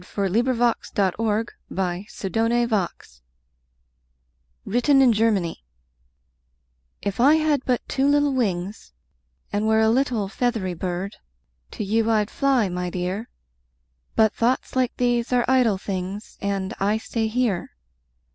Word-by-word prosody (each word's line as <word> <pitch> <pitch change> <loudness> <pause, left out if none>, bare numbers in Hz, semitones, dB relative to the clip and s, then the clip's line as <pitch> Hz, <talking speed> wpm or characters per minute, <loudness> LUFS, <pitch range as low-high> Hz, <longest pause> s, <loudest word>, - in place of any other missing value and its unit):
SOMETHING 215 +7 0
CHILDISH, 235 -1 +1
BUT 190 -3 +2
VERY 220 0 +1 0.6
NATURAL[313:1] 225 - -1 1.4
WRITTEN 245 +6 +3
IN 255 -3 +6
GERMANY 205 - 0 1.4
If 200 +1 -3
I 280 +6 +6
had 310 -4 +1
but 250 -2 0
two 270 +1 +1
little 290 -1 +3
wings 195 - -2 0.6
And 205 +1 0
were 220 0 +4
a 220 0 +4
little 240 -5 +1
feathery 220 -4 -1
bird, 180 +3 -4 0.6
To - - -4
you 220 +3 +1
I'd 215 -2 +1
fly, 270 -6 +2
my 180 0 -3
dear! 185 +5 -3 0.9
But 220 -1 +4
thoughts 245 +3 0
like 255 -2 0
these 245 0 +1
are 245 -1 +3
idle 250 -6 +3
things, 190 +2 -5
And 200 0 -2
I 205 +2 +2
stay 225 0 -2
here. 220 -5 -1
220 Hz, 125 wpm, -23 LUFS, 195-245 Hz, 1.4 s, IN